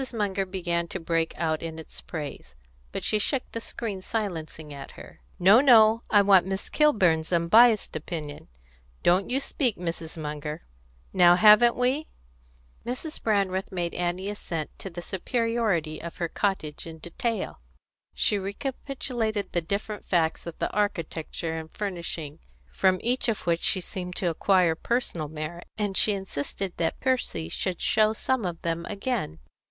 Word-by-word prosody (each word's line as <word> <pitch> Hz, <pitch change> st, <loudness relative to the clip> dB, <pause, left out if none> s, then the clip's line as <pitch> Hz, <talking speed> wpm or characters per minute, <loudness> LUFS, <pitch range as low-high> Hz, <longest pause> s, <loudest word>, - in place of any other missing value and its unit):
Munger 195 Hz, -3 st, 0 dB
began 175 Hz, -2 st, -1 dB
to 190 Hz, -, -5 dB
break 165 Hz, -1 st, 0 dB
out 160 Hz, -2 st, 0 dB
in 165 Hz, -1 st, -5 dB
its 160 Hz, -, -8 dB
praise, 145 Hz, -, -7 dB, 0.4 s
but -, -, -4 dB
she 215 Hz, -, +2 dB
shook 255 Hz, +5 st, +1 dB
the 230 Hz, -, -4 dB
screen 210 Hz, -4 st, -5 dB
silencingly 165 Hz, -8 st, -4 dB
at 140 Hz, -1 st, -9 dB
her. -, -, -13 dB, 0.2 s
"No, 195 Hz, +7 st, +7 dB
no! 230 Hz, -4 st, +6 dB
I 205 Hz, -1 st, +6 dB
want 190 Hz, -2 st, +5 dB
Miss 190 Hz, +1 st, -3 dB
Kilburn's 185 Hz, -, +3 dB
unbiassed 210 Hz, +7 st, +5 dB
opinion. 155 Hz, -2 st, -5 dB, 0.6 s
Don't 185 Hz, +2 st, +3 dB
you 260 Hz, +2 st, +2 dB
speak, 260 Hz, -4 st, 0 dB
Mrs. 165 Hz, -1 st, -4 dB
Munger! 150 Hz, 0 st, -5 dB, 0.5 s
Now 175 Hz, -2 st, +7 dB
haven't 215 Hz, +5 st, +7 dB
we?" 260 Hz, +5 st, 0 dB, 0.8 s
Mrs. 255 Hz, +6 st, -4 dB
Brandreth 195 Hz, -3 st, 0 dB
made 175 Hz, -2 st, -2 dB
Annie 180 Hz, +2 st, -2 dB
assent 165 Hz, -6 st, -5 dB
to 195 Hz, -, -6 dB
the 175 Hz, 0 st, -7 dB
superiority 210 Hz, -6 st, -1 dB
of 170 Hz, 0 st, -7 dB
her 170 Hz, -, -1 dB
cottage 165 Hz, -5 st, -2 dB
in 165 Hz, -1 st, -8 dB
detail. 190 Hz, -, -3 dB, 0.6 s
She 205 Hz, -, +2 dB
recapitulated 225 Hz, 0 st, -3 dB
the 175 Hz, -, 0 dB
different 200 Hz, +5 st, -4 dB
facts 165 Hz, -2 st, +1 dB
of 170 Hz, -, -7 dB
the -, -, -2 dB
architecture 165 Hz, -4 st, -2 dB
and 160 Hz, 0 st, -9 dB
furnishing, 170 Hz, -7 st, -4 dB, 0.3 s
from 185 Hz, -1 st, +3 dB
each 245 Hz, +1 st, +1 dB
of 220 Hz, -, -1 dB
which 170 Hz, -1 st, +1 dB
she 185 Hz, -, +1 dB
seemed 180 Hz, 0 st, -6 dB
to 180 Hz, -5 st, 0 dB
acquire 180 Hz, 0 st, +3 dB
personal 170 Hz, -4 st, -1 dB
merit, 155 Hz, +3 st, -6 dB
and 205 Hz, -3 st, -1 dB
she 210 Hz, -, +4 dB
insisted 190 Hz, 0 st, -4 dB
that 165 Hz, -1 st, -1 dB
Percy 255 Hz, -, 0 dB
should 180 Hz, -, -3 dB
show 215 Hz, 0 st, +3 dB
some 245 Hz, 0 st, 0 dB
of 170 Hz, -2 st, -3 dB
them 170 Hz, 0 st, -1 dB
again. 205 Hz, -, -2 dB
185 Hz, 155 wpm, -27 LUFS, 165-215 Hz, 0.8 s, No